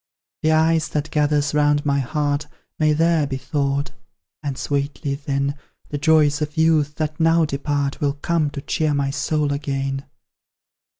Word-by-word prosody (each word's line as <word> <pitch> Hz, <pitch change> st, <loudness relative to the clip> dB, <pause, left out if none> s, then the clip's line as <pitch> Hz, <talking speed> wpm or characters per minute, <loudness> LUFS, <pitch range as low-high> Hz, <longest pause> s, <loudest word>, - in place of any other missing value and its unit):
The 155 Hz, -, +2 dB
ice 160 Hz, 0 st, +3 dB
that 150 Hz, 0 st, -3 dB
gathers 150 Hz, -1 st, +1 dB
round 145 Hz, 0 st, +2 dB
my 140 Hz, -1 st, +2 dB
heart 145 Hz, +2 st, -1 dB, 0.3 s
May 155 Hz, -1 st, +4 dB
there 165 Hz, -1 st, +2 dB
be 135 Hz, -1 st, -3 dB
thawed; 140 Hz, 0 st, -1 dB, 0.5 s
and 140 Hz, -3 st, -4 dB
sweetly, 140 Hz, 0 st, -2 dB
then, 140 Hz, 0 st, -1 dB, 0.4 s
The 145 Hz, -, -3 dB
joys 150 Hz, -1 st, +3 dB
of 150 Hz, +1 st, -3 dB
youth, 155 Hz, -2 st, +3 dB
that 155 Hz, -1 st, -3 dB
now 165 Hz, 0 st, +4 dB
depart, 140 Hz, -1 st, -2 dB
Will 140 Hz, -1 st, +1 dB
come 155 Hz, +1 st, 0 dB
to 140 Hz, -1 st, -6 dB
cheer 155 Hz, -2 st, 0 dB
my 140 Hz, -1 st, 0 dB
soul 150 Hz, 0 st, 0 dB
again. 135 Hz, -1 st, -3 dB
145 Hz, 155 wpm, -22 LUFS, 140-155 Hz, 0.5 s, May